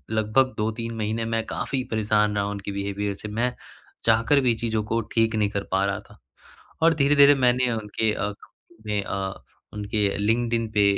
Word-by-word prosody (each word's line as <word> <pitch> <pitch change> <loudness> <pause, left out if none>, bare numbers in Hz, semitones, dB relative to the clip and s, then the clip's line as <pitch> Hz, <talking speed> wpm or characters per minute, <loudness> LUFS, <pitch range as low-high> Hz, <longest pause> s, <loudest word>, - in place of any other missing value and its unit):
लगभग 110 +5 +2
2-3 115 +2 -2
महीने 110 +1 -2
में 115 0 -1
काफी 135 -2 -3
परेशान 105 -1 +1
रहा 100 -1 0
उनके 100 0 -5
बिहेवियर 100 +1 -2
से, 105 - -7
मैं 120 +4 -1 0.5
चाहकर 115 +5 +4
भी 125 -3 +3
चीज़ों 110 -1 -1
को 115 +2 -1 0.2
ठीक 115 -1 +2
नहीं 105 -2 +1
कर 100 -1 -3
पा 95 +1 +2
रहा 100 -1 -1
था। - - -17 0.7
और 165 0 +5
धीरे-धीरे 145 -1 +6
मैंने 125 -1 +2
उनके 110 0 -1
अ, 105 +1 -2 0.5
में 105 -1 0
अ, 95 -1 -3 0.4
उनके 105 0 0
लिंक्ड-इन 115 +1 0
पे 105 - +5
110 Hz, 170 wpm, -25 LUFS, 105-115 Hz, 0.7 s, धीरे-धीरे